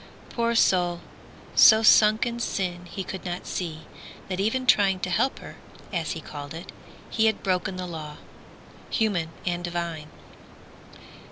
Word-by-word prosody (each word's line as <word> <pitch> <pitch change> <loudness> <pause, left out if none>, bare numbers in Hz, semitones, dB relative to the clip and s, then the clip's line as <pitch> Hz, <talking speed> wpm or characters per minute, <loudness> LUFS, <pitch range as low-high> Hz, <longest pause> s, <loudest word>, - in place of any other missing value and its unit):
Poor 235 0 0
soul 175 -5 +3 0.5
so 220 0 +7
sunk 215 +1 +6
in 235 0 -3
sin 180 -5 -3
he 190 +2 -5
could 190 +1 -7
not 180 -1 -5
see 160 -3 -4 0.5
That 185 0 -3
even 225 +6 0
trying 200 -5 +4
to 185 - -2
help 265 +9 +1
her, - - -11 0.4
as 165 -3 -1
he 160 - -7
called 145 0 -8
it, 165 - -9 0.4
He 220 0 +3
had 220 - 0
broken 185 0 0
the 185 0 -4
law 155 -4 -7 0.7
human 200 -8 0 0.2
and 175 -1 -2
divine. 170 -3 -4
180 Hz, 150 wpm, -25 LUFS, 170-215 Hz, 0.7 s, so